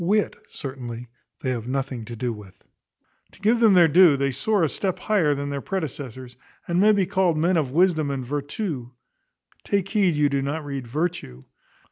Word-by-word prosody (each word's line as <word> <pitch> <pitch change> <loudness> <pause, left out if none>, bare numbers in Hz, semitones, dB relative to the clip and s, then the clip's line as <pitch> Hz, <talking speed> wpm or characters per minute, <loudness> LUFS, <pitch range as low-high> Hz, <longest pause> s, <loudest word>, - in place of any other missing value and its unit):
Wit 205 +4 +1
certainly 125 -3 -7 0.3
they 130 - -1
have 120 -2 -4
nothing 130 -3 -3
to 120 - -7
do 120 +1 -2
with. 105 -3 -14 0.7
To - - -18
give 220 +4 +2
them 220 -4 +5
their 175 -2 +7
due, 165 -2 +6
they 140 0 0
soar 195 +9 +1
a - - +4
step 185 +5 -2
higher 170 -9 +1
than 140 0 -4
their 140 -1 -3
predecessors, 130 - -5 0.3
and 175 +1 +1
may 215 +1 +6
be 200 -3 +2
called 180 -3 +1
men 175 +4 +2
of 155 -6 +1
wisdom 160 0 +2
and 135 -2 -3
vertù 140 - -4 0.7
(take 195 -2 -1
heed 195 -7 +2
you 145 0 +3
do 140 -1 0
not 145 +3 -3
read 135 -3 -5
virtue). 145 - -3
145 Hz, 185 wpm, -24 LUFS, 130-185 Hz, 0.7 s, their